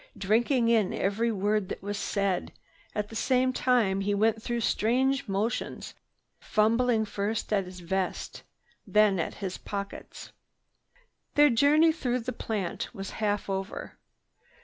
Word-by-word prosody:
Drinking 230 +4 +2
in 220 -5 +2
every 225 +4 0
word 205 -1 0
that - - -6
was 205 +1 -3
said, 200 -3 -1 0.4
at 210 -1 -2
the 225 - -10
same 255 +2 +2
time 225 -8 +2
he 205 +1 0
went 220 +2 +2
through 235 +1 -2
strange 260 +6 +1
motions, 205 +4 -2 0.5
fumbling 225 +1 +2
first 210 +2 -2
at 195 -2 +2
his 185 0 -10
vest, 185 +2 -3 0.5
then 210 -3 +4
at 165 - -2
his 190 -2 -5
pockets. 200 -1 -7 1.0
Their 295 -1 +6
journey 295 +7 +5
through 250 -6 -1
the 250 +2 -4
plant 200 -6 -3
was 195 -1 -6
half 205 -1 0
over. 195 +1 -5
215 Hz, 135 wpm, -28 LUFS, 195-240 Hz, 1.0 s, Their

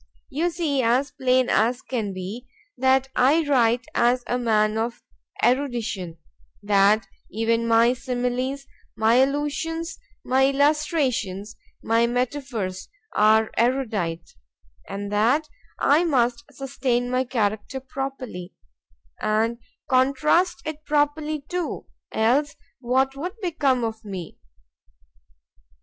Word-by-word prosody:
You 320 +6 0
see 320 -5 0
as 250 +4 +2
plain 255 -2 +2
as 240 +4 +1
can 225 -6 -3
be, 195 +7 -7 0.3
that 265 +1 +2
I 290 +6 +4
write 240 -3 +3
as 245 +1 +2
a 245 - -1
man 215 -2 +2
of 230 +2 -3 0.4
erudition;—that 205 - 0 0.2
even 230 +2 0
my 230 +1 +5
similies, 255 +1 -2 0.3
my 220 +2 +3
allusions, 295 +5 -1 0.2
my 265 +1 +3
illustrations, 275 - 0 0.3
my 230 +1 +3
metaphors, 240 -6 -3 0.3
are 215 +1 +4
erudite,—and 175 - -3
that 240 +9 +2 0.3
I 300 +4 +4
must 250 -4 +1
sustain 260 -3 -2
my 255 +1 +2
character 220 0 -2
properly, 260 -8 -6 0.7
and 225 +2 +1 0.3
contrast 280 +7 +2
it 310 0 -5
properly 300 0 0
too,—else 290 -4 -2 0.2
what 265 +2 +1
would 355 +8 -5
become 290 - +1
of 225 0 -4
me? 190 -6 -7
250 Hz, 100 wpm, -24 LUFS, 220-280 Hz, 0.7 s, my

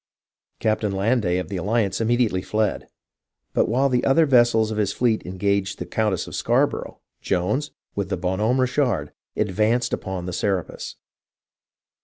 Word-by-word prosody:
Captain 110 -1 0
Landais 95 -2 +1
of 90 - -4
the 100 - -3
Alliance 100 +1 0
immediately 115 -4 +1
fled; 105 +1 -1 0.7
but - - +2
while 130 +5 +3
the 125 -2 +1
other 155 +4 +4
vessels 120 -5 +4
of 110 - -2
his 100 -2 +1
fleet 115 -2 +1
engaged 100 +1 -1
the 90 - -5
Coun 105 +4 0
tess 95 - -2
of - - -10
ScarborougJi, - - 0 0.2
Jones, 105 +11 0 0.2
with 100 -2 -3
the 95 - -1
Bon 95 +2 -2
Homme 115 +5 +2
Richard^ 125 - +1 0.3
advanced 110 +4 +1
upon 95 -2 -3
the 90 - -4
Serapis. 95 -2 -2
105 Hz, 155 wpm, -23 LUFS, 95-120 Hz, 0.7 s, other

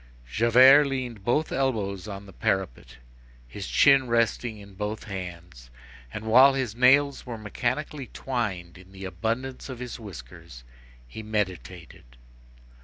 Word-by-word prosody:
Javert 130 - +6
leaned 125 -6 -4
both 150 +8 0
elbows 105 -8 -2
on 100 -1 -7
the 95 - -14
parapet, - - -3 0.5
his 95 +11 -7
chin 135 -2 +4
resting 115 -1 0
in 100 -1 -13
both 105 +2 -5
hands, 90 - -9 0.4
and, 105 - -7
while 130 +5 +6
his 130 -6 -2
nails 135 +3 +4
were 120 -2 -5
mechanically 125 +6 -3
twined 95 -9 -4
in 95 +1 -17
the 95 0 -9
abundance 115 +10 -4
of 130 - -6
his 125 0 -7
whiskers, 60 - -11 0.4
he 65 - -9
meditated. 95 - -5
110 Hz, 130 wpm, -26 LUFS, 95-125 Hz, 0.5 s, Javert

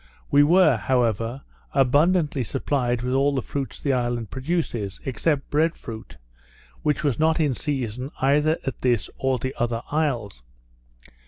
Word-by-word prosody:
We 145 - +6
were, 155 -3 +5
however, 120 +1 0 0.3
abundantly 145 +2 +3
supplied 125 -1 -1
with 125 +1 -1
all 140 +1 +2
the 130 - -1
fruits 140 -2 -4
the 140 - 0
island 120 -3 -1
produces, 130 - -2
except 135 +2 -1
bread 160 +3 +2
fruit, 110 - -9 0.6
which 150 0 0
was 140 -6 0
not 160 +1 +3
in 150 -4 +2
season 125 -3 -3
either 150 +4 +3
at 135 - -4
this 120 -4 +1
or 130 -1 +1
the 130 +2 -4
other 120 -1 -1
isles. 125 - -1
135 Hz, 145 wpm, -24 LUFS, 120-150 Hz, 0.6 s, We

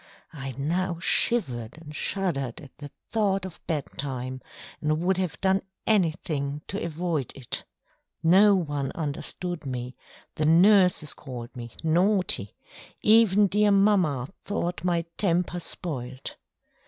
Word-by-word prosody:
I 135 -3 -5
now 170 +5 -1
shivered 125 - +1
and 150 -2 -11
shuddered 150 - -2
at 145 -5 -14
the 145 -1 -8 0.2
thought 195 -4 +1
of 185 - -9
bed 150 -4 -1
time, 130 -2 -4 0.4
and 155 +1 +1
would 190 +1 +2
have 185 -3 -2
done 190 0 +3 0.2
anything 155 -7 0
to 200 +3 -3
avoid 165 -4 -2
it. 130 -3 -5 0.6
No 195 +5 +6
one 145 -6 -2
understood 165 +3 -3
me, 125 -2 -5 0.4
the 155 - -1
nurses 180 -2 +5
called 125 -3 -9
me 120 -2 -8
"naughty"; 175 - +2 0.5
even 210 -2 +6
dear 210 +2 +3
mamma 195 -10 +3 0.2
thought 180 -4 -3
my 170 -2 +1
temper 175 -2 +1
spoilt. 130 -7 -5
165 Hz, 125 wpm, -26 LUFS, 140-190 Hz, 0.6 s, No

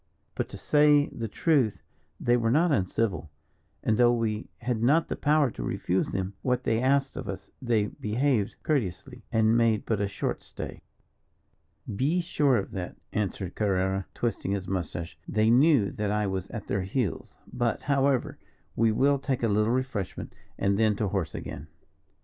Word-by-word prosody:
"But - - -3
to - - -8
say 150 -1 +4
the 115 - -5
truth, 130 - +1 0.4
they 120 - +3
were 115 -2 +1
not 160 +7 +3
uncivil, 95 - 0 0.5
and 110 - +2
though 120 -1 +6
we 115 -2 -1
had 120 -2 -2
not 150 +8 +3
the - - -1
power 150 -3 +2
to - - -8
refuse 90 +9 0
them 95 0 -3
what 125 +1 0
they 115 +1 +1
asked 135 +1 +2
of - - -5
us, - - -7
they 115 -5 +2
behaved 110 +1 0
courteously, 125 - -2
and 110 0 +3
made 115 -2 +2
but 110 -3 0
a 100 - +1
short 100 - -3
stay." - - -8 1.1
"Be 150 - +1
sure 145 -6 +2
of 100 - -3
that," 95 -5 -5 0.2
answered 100 -3 -2
Carrerra, 95 -2 0
twisting 115 -4 -1
his 95 -2 -3
moustache; 85 -3 -4
"they 110 +1 +2
knew 130 -4 +5
that 105 -1 -2
I 105 0 +1
was 95 -1 -2
at 110 -2 -7
their 100 - -1
heels. 95 +1 -3 0.2
But, 120 -2 -1
however, 140 -2 +1 0.4
we 115 0 +3
will 140 +5 +3
take 130 -2 -2
a - - +4
little 105 +1 +2
refreshment, 125 -7 -3 0.2
and 100 +1 +1
then 110 -2 +3
to 105 -1 -1
horse 95 -7 -2
again." 75 +2 -7
110 Hz, 170 wpm, -27 LUFS, 100-130 Hz, 1.1 s, though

